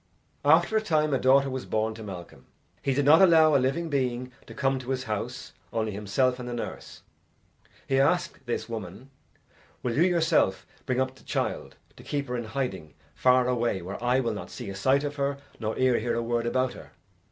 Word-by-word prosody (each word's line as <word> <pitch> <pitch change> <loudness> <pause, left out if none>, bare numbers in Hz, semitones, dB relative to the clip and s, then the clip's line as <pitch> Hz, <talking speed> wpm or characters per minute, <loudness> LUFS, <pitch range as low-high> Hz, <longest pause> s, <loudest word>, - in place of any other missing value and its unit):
After 165 +8 +4
a 220 - +4
time 155 -7 +1
a 135 - +2
daughter 135 +2 +4
was 130 0 -5
born 110 0 0
to 110 - -10
Malcolm. 95 -5 -9 0.3
He 135 - 0
did 145 0 +1
not 155 +4 +7
allow 160 -4 +6
a 135 - +4
living 135 +6 0
being 125 -4 -1 0.2
to - - -11
come 135 -1 +1
to 130 0 -9
his 130 -1 -1
house, 105 -3 -5 0.2
only 110 -1 -1
himself 105 +6 0
and 125 0 -6
the 120 - -4
nurse. 120 - -7 0.8
He 135 0 +2
asked 145 +2 +1
this 120 - -2
woman, 110 +3 -7 0.7
"Will 120 -2 -1
you 150 - +2
yourself 165 - +2 0.2
bring 130 0 0
up 130 0 0
the - - -19
child - - -3 0.2
to - - -13
keep 140 -1 -3
her 125 - -2
in 120 -1 -3
hiding 110 - -4 0.2
far 125 - +3
away 120 -7 0
where 100 +6 -6
eye 125 +2 +3
will 115 -3 -1
not 105 - -7
see 120 -6 -7
a - - -7
sight 130 +8 +2
of 145 0 -4
her 140 0 -1 0.2
nor 110 -1 -3
ear 130 -2 +3
hear 120 +2 -1
a 115 - -1
word 120 0 -1
about 130 +1 0
her?" - - -13
130 Hz, 210 wpm, -27 LUFS, 115-140 Hz, 0.8 s, not